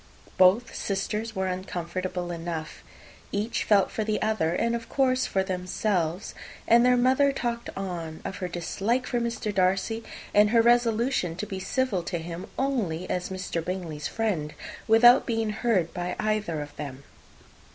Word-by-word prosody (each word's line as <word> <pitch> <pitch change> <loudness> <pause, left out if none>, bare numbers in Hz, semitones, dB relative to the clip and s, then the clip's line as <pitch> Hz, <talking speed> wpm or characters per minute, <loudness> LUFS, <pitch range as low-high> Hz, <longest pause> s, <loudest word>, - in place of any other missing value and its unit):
Both 190 +7 +4
sisters 210 +3 -2
were 190 0 0
uncomfortable 180 -1 -3
enough. 165 -2 -5 0.5
Each 210 +3 -1
felt 200 -3 +3
for 220 - -2
the 215 0 0
other, 215 -7 +1
and 235 +4 +1
of 230 -1 -6
course 255 -2 +2
for 190 - +1
themselves; 185 -1 -1 0.3
and 235 +1 +6
their 250 0 +5
mother 260 +3 +4
talked 235 -3 -3
on 170 -5 -4
of 190 - -4
her 185 - -3
dislike 200 +9 -2
of 240 - +2
Mr. 230 -2 -2
Darcy, 195 +4 +1 0.3
and 210 0 +6
her 230 +1 +5
resolution 235 -5 +2
to 185 - -4
be 190 -2 -5
civil 230 -1 0
to 175 +1 -3
him 170 +2 -6
only 210 -11 -1
as 180 0 -2
Mr. 185 -3 -3
Bingley's 165 -5 -4
friend, 185 -10 -2 0.3
without 240 +3 +7
being 225 -2 0
heard 210 -6 0
by 180 0 -3
either 210 -7 -1
of 145 0 -13
them. 140 -2 -7
195 Hz, 155 wpm, -27 LUFS, 175-230 Hz, 0.5 s, without